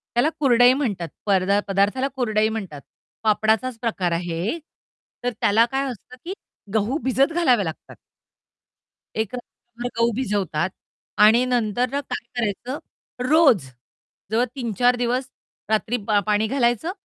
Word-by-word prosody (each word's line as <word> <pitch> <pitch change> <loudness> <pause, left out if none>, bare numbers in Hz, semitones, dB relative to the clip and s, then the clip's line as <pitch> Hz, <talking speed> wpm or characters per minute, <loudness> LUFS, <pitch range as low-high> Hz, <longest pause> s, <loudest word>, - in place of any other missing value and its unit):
त्याला 260 +6 +3
कुरडई 245 -3 +6
म्हणतात 210 - -2 0.2
परदा 200 0 +3
पदार्थाला 200 +7 +1
कुरडई 220 -4 +1
म्हणतात. 190 -10 -5 0.4
पापडाचाच 220 +3 +2
प्रकार 195 -7 -1
आहे 170 - -2 0.7
तर 245 - +1
त्याला 220 +3 +5
काय 270 +1 0
असतं 250 +2 -12
की 370 - -3 0.4
गहू 220 +6 +1
भिजत 270 +5 +2
घालावे 255 - +3
लागतात. 160 -1 -7 1.2
एक 220 +1 -2
रात्रभर 240 0 -8
गहू 230 0 +3
भिजवतात 195 - -1 0.5
आणि 225 +4 +6
नंतर 245 -1 0
ना 280 - 0
काय 270 - -6
करायचं 240 +4 -2 0.5
रोज 285 - +5 0.7
जवळ 235 +3 +3
3-4 245 -1 +1
दिवस 245 +2 -1 0.4
रात्री 220 +2 +1
पा 210 -2 +4
पाणी 210 +1 +2
घालायचं 245 - +1
230 Hz, 125 wpm, -23 LUFS, 205-255 Hz, 1.2 s, कुरडई